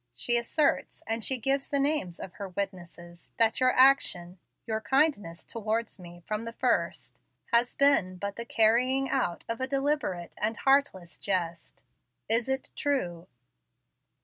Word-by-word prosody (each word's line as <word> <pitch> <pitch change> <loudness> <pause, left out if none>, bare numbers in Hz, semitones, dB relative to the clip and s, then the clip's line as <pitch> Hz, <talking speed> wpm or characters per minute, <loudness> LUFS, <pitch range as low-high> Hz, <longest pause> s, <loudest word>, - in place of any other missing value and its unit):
She 240 - +2
asserts, 260 +5 0
and 225 0 -2
she 265 - +3
gives 270 +3 -1
the 280 - +1
names 275 - -1
of 185 - -8
her 200 -2 -7
witnesses, 175 -3 -7
that 225 -1 +3
your 255 0 +4
action 190 -10 +3 0.3
your 220 -1 -2
kindness 265 - 0
towards 225 -1 -3
me 175 -1 -13
from 215 0 -3
the 230 0 -6
first - - -1 0.3
has 235 +1 +3
been 245 -10 +3
but 200 +2 -5
the 235 - -5
carrying 245 +4 +2
out 210 -10 -1
of 230 +2 -4
a 260 - -1
deliberate 275 - -2
and 220 +2 -1
heartless 270 -11 +1
jest. 175 -4 -3 0.4
Is 230 +3 +1
it 265 0 -3
true?" 180 - -2
225 Hz, 150 wpm, -28 LUFS, 185-265 Hz, 0.4 s, your